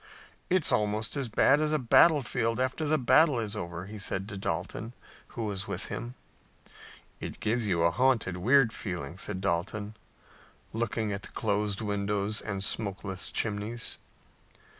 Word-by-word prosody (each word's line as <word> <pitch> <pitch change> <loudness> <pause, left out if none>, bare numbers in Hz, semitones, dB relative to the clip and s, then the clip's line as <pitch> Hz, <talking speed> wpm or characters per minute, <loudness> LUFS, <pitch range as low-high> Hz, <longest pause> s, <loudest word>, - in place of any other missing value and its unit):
"It's 185 -3 +3
almost 105 +3 0
as 135 -4 -2
bad 135 +6 +4
as 155 0 +1
a 155 - +3
battlefield 125 -4 +4
after 130 +5 0
the 155 +1 +3
battle 135 +1 +4
is 110 -2 -3
over," 85 -2 -5
he 105 +2 -8
said 95 0 -2
to 100 - -6
Dalton, 95 +5 -3 0.4
who 115 - -1
was 100 -2 -3
with 100 -2 -3
him. 120 +2 -5 1.0
"It - - -6
gives 110 +1 0
you 85 -4 +2
a 85 - +4
haunted, 115 -5 +2
weird 120 +4 +4
feeling," 90 -3 -5
said 95 - -4
Dalton, 100 +3 -2 0.8
looking 110 -2 -1
at 100 - -4
the - - -7
closed 105 -2 -1
windows 100 0 -1
and 100 -2 -3
smokeless 100 -3 -1
chimneys. 110 +2 -1
105 Hz, 150 wpm, -29 LUFS, 100-120 Hz, 1.0 s, bad